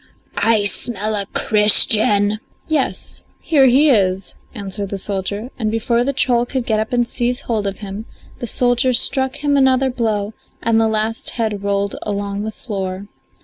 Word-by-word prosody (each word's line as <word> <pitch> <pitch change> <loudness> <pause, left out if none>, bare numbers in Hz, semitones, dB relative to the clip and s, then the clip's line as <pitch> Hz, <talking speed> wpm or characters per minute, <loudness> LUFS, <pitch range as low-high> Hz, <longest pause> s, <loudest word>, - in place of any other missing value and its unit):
I 225 -2 +2
smell 210 +1 -1
a 200 -2 -3
Christian." 210 -1 +4 0.3
"Yes, 305 -4 -2 0.2
here 280 -5 +3
he 280 +4 +5
is," 190 -4 +1 0.2
answered 200 -1 -4
the 200 - -4
soldier, 200 +4 -3
and 220 -2 -1
before 235 +2 0
the 275 - 0
troll 245 -3 +2
could 260 -2 -3
get 220 -2 0
up 220 - -3
and 240 -1 +1
seize 245 +1 -2
hold 215 -4 -2
of 195 - -4
him 205 +2 -7 0.3
the 240 - -5
soldier 245 +3 +1
struck 265 +2 +2
him 290 -1 +2
another 265 -1 +3
blow 220 -4 -2 0.3
and 225 0 +2
the 225 - +2
last 220 +1 -1
head 215 -4 -2
rolled 200 0 -1
along 200 -1 -3
the 220 +1 -4
floor. 195 -3 -6
220 Hz, 165 wpm, -18 LUFS, 200-245 Hz, 0.3 s, he